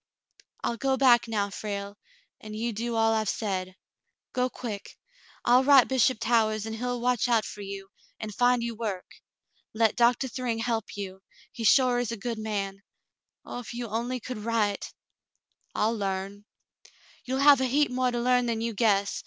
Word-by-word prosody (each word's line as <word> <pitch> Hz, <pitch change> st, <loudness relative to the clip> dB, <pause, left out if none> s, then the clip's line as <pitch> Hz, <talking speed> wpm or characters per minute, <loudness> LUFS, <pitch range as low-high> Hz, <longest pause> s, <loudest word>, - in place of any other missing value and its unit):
"I'll 235 Hz, -, -1 dB
go 265 Hz, +2 st, +1 dB
back 245 Hz, -3 st, +5 dB
now, 205 Hz, -3 st, -1 dB
Frale, 200 Hz, -1 st, -5 dB, 0.4 s
and 215 Hz, 0 st, -9 dB
you 230 Hz, +2 st, -2 dB
do 230 Hz, +2 st, -3 dB
all 225 Hz, 0 st, +3 dB
I've 220 Hz, -2 st, 0 dB
said. 185 Hz, -4 st, -3 dB, 0.6 s
Go 250 Hz, 0 st, +1 dB
quick. 220 Hz, -6 st, -7 dB, 0.5 s
I'll 250 Hz, +2 st, +5 dB
write 275 Hz, -2 st, +7 dB
Bishop 260 Hz, -1 st, +2 dB
Towahs, 220 Hz, -2 st, +1 dB
and 220 Hz, 0 st, -5 dB
he'll 245 Hz, +1 st, -2 dB
watch 245 Hz, 0 st, +1 dB
out 230 Hz, -3 st, +2 dB
for 205 Hz, -, -8 dB
you, 195 Hz, -1 st, -7 dB, 0.3 s
and 215 Hz, -1 st, -6 dB
find 245 Hz, +1 st, +3 dB
you 235 Hz, 0 st, -3 dB
work. 210 Hz, -5 st, -4 dB, 0.7 s
Let 220 Hz, -1 st, +3 dB
Doctah 245 Hz, +1 st, +3 dB
Thryng 245 Hz, -2 st, -2 dB
help 225 Hz, -2 st, -2 dB
you. 190 Hz, -1 st, -6 dB, 0.3 s
He 230 Hz, -, -7 dB
sure 250 Hz, +1 st, +5 dB
is 245 Hz, -2 st, -2 dB
a 230 Hz, -, -4 dB
good 230 Hz, +2 st, -4 dB
man. 200 Hz, -3 st, -3 dB, 0.6 s
Oh, -, -, -6 dB
if 240 Hz, -1 st, -8 dB
you 240 Hz, 0 st, -4 dB
only 240 Hz, +4 st, -2 dB
could 245 Hz, -1 st, -6 dB
write 210 Hz, -2 st, -1 dB, 0.4 s
!" -, -, -45 dB
"I'll 220 Hz, +2 st, +1 dB
larn." 200 Hz, 0 st, -4 dB, 0.8 s
"You'll 260 Hz, +1 st, -2 dB
have 280 Hz, -2 st, +7 dB
a -, -, +2 dB
heap 285 Hz, +2 st, +2 dB
more 255 Hz, 0 st, +1 dB
to 240 Hz, -1 st, -2 dB
learn 250 Hz, 0 st, +2 dB
than 230 Hz, -1 st, -1 dB
you 230 Hz, 0 st, -2 dB
guess. 200 Hz, -2 st, +1 dB
230 Hz, 180 wpm, -27 LUFS, 210-245 Hz, 0.8 s, write